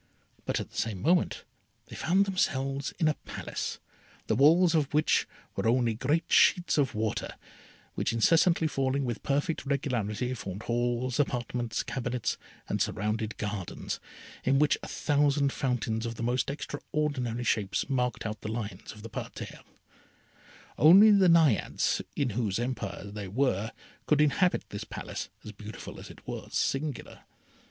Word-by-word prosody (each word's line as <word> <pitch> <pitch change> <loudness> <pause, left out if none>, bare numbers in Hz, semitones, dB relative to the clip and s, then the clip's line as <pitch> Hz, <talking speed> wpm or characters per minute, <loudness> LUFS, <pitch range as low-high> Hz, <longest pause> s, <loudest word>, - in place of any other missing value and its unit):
But - - 0
at - - -6
the - - -11
same 110 -4 -1
moment 170 - +2 0.4
they - - -11
found 190 +4 +2
themselves 135 -8 -1
in 160 - +2
a 155 - +3
Palace, - - -4 0.5
the 110 - +1
walls 165 +7 +5
of 150 -4 +1
which 155 +1 +3 0.3
were - - 0
only 120 -1 +3
great 145 +9 0
sheets 175 -3 +5
of 135 -4 +1
water, 110 0 -2 0.6
which - - -1
incessantly 165 +8 +4
falling 135 -1 0
with 120 -3 -3
perfect 145 +3 0
regularity, 125 -4 -1
formed 100 -4 -6
halls, 120 +1 -1
apartments, 120 -4 -1
cabinets, 125 -2 -2 0.3
and - - -1
surrounded 105 +2 -1
gardens, 105 -4 -4 0.4
in 135 +1 +3
which 150 +1 +4
a - - -7
thousand 145 -1 +2
fountains 115 -3 -1
of 115 - -5
the 115 - -5
most 125 +3 0
extraordinary 145 -4 -2
shapes 105 -5 0
marked 125 -5 -1
out 110 -2 -4
the 110 - -4
lines 105 -3 -5
of 105 -1 -13
the 115 - -7
parterres. - - -7 1.2
Only 195 +8 +9
the 195 -3 +6
Naiades, 160 -9 +3
in 140 -5 0
whose 105 -3 -1
empire 120 -6 -3
they 100 0 -6
were, 110 -1 0 0.4
could 150 - +3
inhabit 150 +5 +3
this 100 +1 -4
Palace, - - -6
as 105 - -7
beautiful 105 +1 -9
as - - -10
it - - -15
was - - -4
singular. 140 -1 -2
125 Hz, 150 wpm, -29 LUFS, 110-145 Hz, 1.2 s, Only